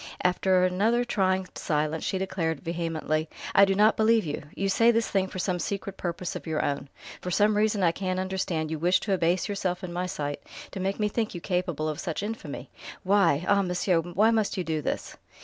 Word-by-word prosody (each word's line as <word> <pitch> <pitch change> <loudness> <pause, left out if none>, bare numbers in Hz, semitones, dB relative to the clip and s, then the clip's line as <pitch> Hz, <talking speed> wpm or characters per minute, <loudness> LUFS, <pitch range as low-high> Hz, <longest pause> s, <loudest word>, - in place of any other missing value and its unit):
After 180 0 +3
another 220 +7 +2
trying 190 -4 +1
silence 155 +1 -1
she 190 - -1
declared 170 -5 -2
vehemently: 165 -2 -2 0.2
"I 200 - +7
do 195 0 +1
not 210 +2 +5
believe 220 -1 +4
you! 145 - -3
You 195 - -1
say 230 +4 +4
this 230 -1 +2
thing 190 -1 +1
for 190 - -8
some 180 -1 -1
secret 195 +2 -3
purpose 175 -1 -4
of - - -7
your 155 -1 0
own. 140 -1 -2 0.3
For 180 - -4
some 210 +3 +3
reason 210 -1 +2
I 170 - +5
can't 185 +1 -2
understand 185 -4 -2
you 160 - -3
wish 180 +3 +3
to 200 - -1
abase 175 -1 +1
yourself 190 -2 -2
in 175 -1 -5
my 180 +1 -2
sight, 145 -4 -4 0.3
to - - -6
make 195 +2 -2
me 210 - +2
think 215 -1 -2
you - - -4
capable 175 -4 -1
of 155 -1 -3
such 175 +2 -3
infamy. 225 +3 -6 0.3
Why 180 -5 +3
ah, 200 0 +4
monsieur! 180 -1 +1
why 175 +7 +2
must 220 -3 0
you 185 - 0
do 160 -2 -2
this?" - - -4
185 Hz, 210 wpm, -27 LUFS, 165-200 Hz, 0.3 s, I